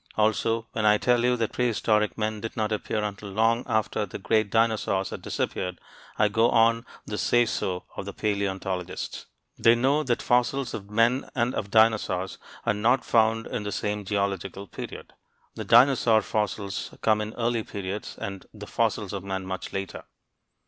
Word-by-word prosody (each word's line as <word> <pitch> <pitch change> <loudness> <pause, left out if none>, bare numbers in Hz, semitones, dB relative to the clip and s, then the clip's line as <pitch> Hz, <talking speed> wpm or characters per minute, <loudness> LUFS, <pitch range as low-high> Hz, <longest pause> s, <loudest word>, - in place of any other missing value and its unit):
Also, 110 +1 +1
when 110 - -2
I 105 0 +5
tell 120 +1 +2
you 125 0 +3
that 115 -2 -1
prehistoric 110 -3 +1
men 110 -1 -2
did 115 - -6
not 110 0 0
appear 105 0 -1
until 100 -1 -5
long 115 +4 +2
after 110 -2 0
the 100 - -6
great 110 +1 +1
dinosaurs 110 -3 +1
had - - -6
disappeared, 90 -1 -3 0.4
I 105 - +4
go 115 +3 +3
on 115 +1 +3 0.2
the 105 - -4
say 120 0 +3
so 90 -5 -2
of - - -5
the 100 - -5
paleontologists. 95 -3 -3 0.3
They 115 +1 +6
know 135 +5 +2
that 125 -5 -1
fossils 125 +1 +1
of 100 -1 -6
men 115 +5 +2
and 120 0 +1
of 100 - -3
dinosaurs 110 -4 +2 0.3
are 115 - +3
not 115 +6 +2
found 115 0 +3
in 125 -4 -4
the 105 0 -4
same 105 0 -2
geological 100 -1 -2
period. 90 - -9 0.4
The - - -6
dinosaur 120 -3 +5
fossils 100 -5 -3
come 110 -1 +3
in 105 +1 -5
early 120 -1 0
periods, 100 -1 -5 0.4
the 105 -1 -10
fossils 105 -3 -1
of 100 -2 -4
men 95 -1 -4
much 95 0 -5
later. 95 -1 -5
110 Hz, 170 wpm, -26 LUFS, 100-115 Hz, 0.4 s, They